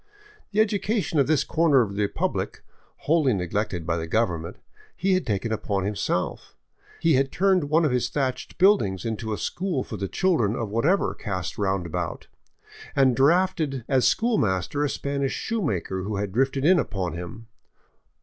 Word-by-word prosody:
The 210 - 0
education 205 -6 +1
of 140 - +3
this 150 -2 +3
corner 155 -4 +3
of 100 -3 -5
the 105 - -2
republic, 100 - -2 0.4
wholly 150 -6 +3
neglected 90 -1 -2
by 85 0 0
the 80 0 -4
government, 85 -5 -1 0.4
he 190 +2 +1
had 185 -6 0
taken 105 +1 -1
upon 100 -3 -1
himself; 100 0 -2 0.5
had 135 -5 +3
turned 190 -4 +2
one 155 +3 +3
of 150 - +1
his 125 -1 0
thatched 130 -3 -3
buildings 115 - +3
into 110 -1 -3
a 105 - -1
school 175 -8 -2
for 110 - -7
the 100 0 -3
children 120 - +1
of 115 -4 -3
whatever 150 - +2
cast 90 -5 -5
roundabout, 90 -4 -2 0.7
and 130 -3 +4
drafted 155 -2 +2
as 130 -3 +3
school 230 -1 +2
master 95 +8 0
a 145 - +1
Spanish 140 -1 -2
shoemaker 105 - -2
who 105 +3 -3
had 100 -1 -2
drifted 135 +5 +1
in 180 +1 +6
upon 95 - -2
him. 90 +7 -7
125 Hz, 160 wpm, -25 LUFS, 100-160 Hz, 0.7 s, in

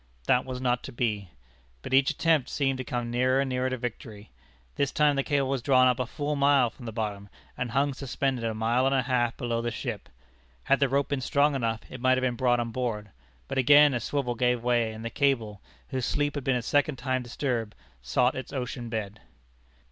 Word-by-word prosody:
That 125 - +3
was 130 -1 -5
not 125 -1 0
to - - -7
be; 105 -6 -2 0.5
but - - -6
each 135 0 +5
attempt 160 -5 +1
seemed 135 -2 0
to - - -2
come 120 -1 -3
nearer 130 +2 +2
and 135 - +1
nearer 130 0 -1
to 130 - -3
victory. 115 -3 -7 0.4
This 140 -1 0
time 150 -1 +3
the 135 - +1
cable 140 -1 0
was 135 -1 -1
drawn 130 0 +4
up 125 0 +2
a 125 - -1
full 150 +3 -3
mile 140 -4 +3
from 120 - -11
the - - -4
bottom, 105 -2 -4 0.3
and 125 -1 -3
hung 140 +4 +1
suspended 135 -2 -2
a 115 -1 -1
mile 120 +4 +1
and 135 - +2
a 130 - +2
half 120 -2 0
below 120 -2 -2
the 120 - -1
ship. - - -5 0.5
Had 135 - +2
the 140 -2 +2
rope 140 +1 +1
been 140 -2 -1
strong 140 +3 +2
enough, 115 -4 -1
it 130 - -9
might 130 0 +4
have 130 - -1
been 125 -1 +1
brought 120 -1 +2
on 115 -1 -2
board. 110 -4 -3 0.4
But - - -2
again 145 +2 +6
a 120 - 0
swivel 125 +1 -2
gave 125 0 0
way, 120 -2 +1
and 110 +1 -8
the 115 - -3
cable, 115 -8 0 0.3
whose 130 -3 -2
sleep 145 0 0
had 145 - -4
been 135 0 +1
a 125 - -2
second 145 +3 +1
time 130 +1 -1
disturbed, 120 -3 -3 0.3
sought 125 - +2
its 130 - -7
ocean 125 -2 -4
bed. 110 -2 -4
125 Hz, 225 wpm, -27 LUFS, 115-135 Hz, 0.5 s, again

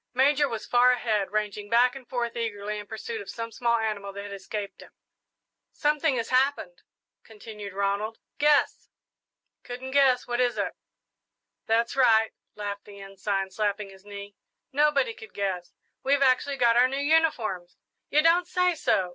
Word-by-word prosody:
Major 285 +2 +3
was 225 -2 -5
far 245 +1 +5
ahead, 215 -6 -1
ranging 210 -1 -2
back 245 +3 +4
and 265 -3 -11
forth 240 -2 -2
eagerly 210 -2 -3
in 205 - -9
pursuit 440 - -5
of - - -10
some 230 0 -5
small 235 0 +1
animal 210 -3 -3
that 200 0 -6
had 205 0 -7
escaped 200 +1 -6
him. - - -13 0.8
"Something 300 -1 +1
has 230 -2 -2
happened," 275 - +1 0.4
continued 210 -2 -9
Ronald; 200 +3 -1 0.2
"guess!" 295 0 +2 0.7
"Couldn't 250 +2 -7
guess 265 -2 +4
what 240 0 -2
is 245 -1 +1
it?" - - -1 0.9
"That's 230 +2 +1
right," 225 -4 +4 0.2
laughed 205 -1 -5
the 200 -1 -12
Ensign, 195 0 -3
slapping 205 0 -2
his 190 0 -16
knee; 200 0 -9 0.4
"nobody 300 - +2
could 445 -1 -13
guess. 185 -3 -3 0.3
We've 280 +1 +2
actually 275 +2 +2
got 235 -2 +4
our 245 +1 +6
new 270 +1 -3
uniforms!" 280 - +1 0.3
"You 300 +1 +3
don't 345 +2 +4
say 360 0 +2
so! 190 - +1
230 Hz, 160 wpm, -27 LUFS, 205-275 Hz, 0.9 s, our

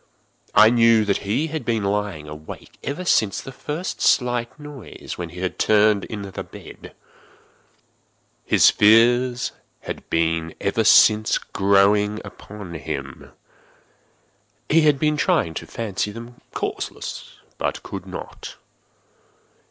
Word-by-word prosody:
I 110 +1 +7
knew 115 -2 +4
that 100 -1 +1
he 140 +9 +1
had 160 - -3
been 115 -3 -1
lying 100 -6 -2
awake 75 +1 -11
ever 150 +6 -4
since 110 - +2
the 135 - -9
first 150 +6 -5
slight 120 +1 +1
noise, 145 -5 -9
when 85 -2 -6
he 90 +2 -9
had 95 - -3
turned 105 -1 +3
in 105 -2 -6
the 95 -2 -6
bed. - - -13 1.5
His - - +5
fears 120 +3 +4 0.3
had - - -8
been 80 0 0
ever 105 +3 0
since 110 0 +5
growing 100 +2 +2
upon 100 -4 -10
him. 75 -4 -6 1.4
He 165 +2 +5
had 150 -2 +4
been 150 +1 +1
trying 85 - +1
to - - -7
fancy 105 -2 -3
them 115 +3 -11
causeless, - - -5 0.2
but - - -2
could - - -7
not. - - -8
110 Hz, 125 wpm, -22 LUFS, 100-125 Hz, 1.5 s, I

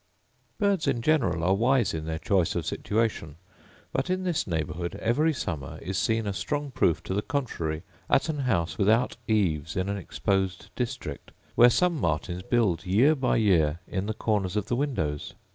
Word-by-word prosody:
Birds 200 -7 +1
in 135 -4 +1
general 115 - +2
are 95 +2 +3
wise 120 +1 +2
in 80 -1 -4
their 80 0 -2
choice 90 0 +1
of - - -2
situation: 105 -9 -1 0.6
but - - -1
in 185 0 0
this 175 -9 -1
neighbourhood 85 0 -3
every 150 +8 +2
summer 80 - -4
is 95 - -5
seen 110 +2 +1
a 100 - -1
strong 145 +7 -3
proof 130 -10 +1
to - - -3
the 100 - +1
contrary 95 - -3 0.3
at - - +3
an 155 -2 -2
house 85 -11 0
without 110 +5 +3
eaves 80 -8 +1
in 95 +1 0
an 100 - -1
exposed 95 0 -2
district, 125 - -4 0.2
where 120 - +7
some 170 +5 +2
martins 85 +2 -1
build 95 -5 +1
year 110 +11 +4
by 135 -4 +1
year 85 -8 +3
in 95 +1 -3
the 110 - -2
corners 105 -4 0
of 105 -1 0
the 120 - +1
windows. 115 - -2
105 Hz, 180 wpm, -27 LUFS, 85-130 Hz, 0.6 s, where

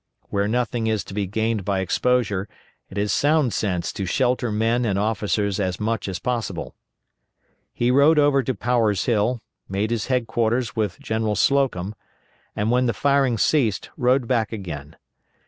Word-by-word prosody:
Where 100 0 0
nothing 120 0 -1
is 110 -3 0
to - - -10
be 100 -1 -1
gained 110 +1 -1
by 100 0 0
exposure 100 0 0 0.4
it 95 - -9
is 100 -1 0
sound 145 -4 +2
sense 90 -5 -1
to 95 - -4
shelter 125 +2 +1
men 115 +3 +1
and 100 -4 0
officers 105 -1 0
as 95 -2 -1
much 110 -2 -1
as 95 -2 -3
possible. 120 +3 -3 1.0
He 120 +1 +1
rode 145 +4 +5
over 145 -2 +4
to 130 0 -2
Power's 110 -2 +1
Hill, 115 +1 +1 0.3
made 100 +3 -1
his 115 -2 -1
headquarters 120 -1 0
with 105 -5 -2
General 110 -1 -1
Slocum, 125 -10 +1 0.6
and 105 +2 0
when 125 +1 +3
the 115 - 0
firing 140 0 +2
ceased 115 -3 +1
rode 125 -2 +2
back 115 -4 +1
again. 85 -9 -7
110 Hz, 160 wpm, -23 LUFS, 100-125 Hz, 1.0 s, rode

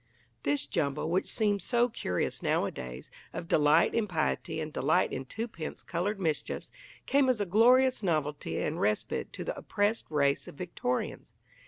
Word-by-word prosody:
This 290 -1 0
jumble 150 +2 -1
which 185 +2 +1
seems 205 -3 +1
so 240 0 +3
curious 90 - -2
nowadays 65 0 -2 0.2
of 170 - -5
delight 150 +1 +4
in 225 -2 +1
piety 160 -2 -1
and 155 -1 -4
delight - - +2
in 130 - -4
twopence 185 - -6
coloured 195 +5 -2
mischiefs 160 -5 -2 0.3
came 275 -1 +3
as 250 -4 +2
a 205 - +1
glorious 250 +7 +5
novelty 155 -6 -1
and 160 - -2
respite 105 0 0
to - - -5
the - - -3
oppressed 205 +2 0
race 140 -2 +1
of - - -10
Victorians. 145 -7 -3
170 Hz, 155 wpm, -30 LUFS, 150-220 Hz, 0.3 s, glorious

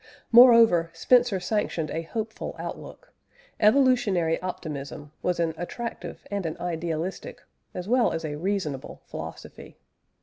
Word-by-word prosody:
Moreover, 230 -8 +7
Spencer 240 +3 +3
sanctioned 180 -4 -2
a 165 - -2
hopeful 220 +6 -5
outlook; - - -9 0.5
evolutionary 215 -8 +3
optimism 145 -5 -6
was 180 -1 -1
an 165 -1 0
attractive 230 +7 -6
and 200 -4 -2
an 160 - -5
idealistic, 170 +1 -4 0.3
as 180 +1 -5
well 245 +1 +3
as 165 -1 -3
a 150 -1 -4
reasonable 160 -5 -3
philosophy. - - -9
180 Hz, 115 wpm, -26 LUFS, 165-225 Hz, 0.5 s, Moreover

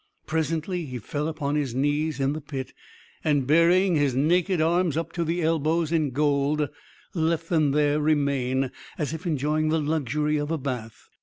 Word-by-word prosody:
Presently 160 +2 -1
he 125 -1 -5
fell 145 +6 -3
upon 150 -3 -2
his 140 -5 -1
knees 145 +2 0
in 135 +1 +1
the 155 - -5
pit, 135 -3 -6 0.5
and 145 -4 +2
burying 170 +5 +4
his 145 -4 +1
naked 175 +6 +2
arms 165 -1 +2
up 165 - -2
to 170 - -2
the 170 +1 -1
elbows 160 0 +1
in 155 -3 +2
gold, 145 +2 +1 0.5
let 165 -1 0
them 155 -4 +3
there 145 +1 +2
remain, 140 -4 +1 0.3
as 150 0 -2
if 160 +3 -5
enjoying 155 0 0
the 160 +1 +2
luxury 150 0 0
of 145 0 -2
a 165 - 0
bath. 125 -5 -6
150 Hz, 170 wpm, -25 LUFS, 140-160 Hz, 0.5 s, burying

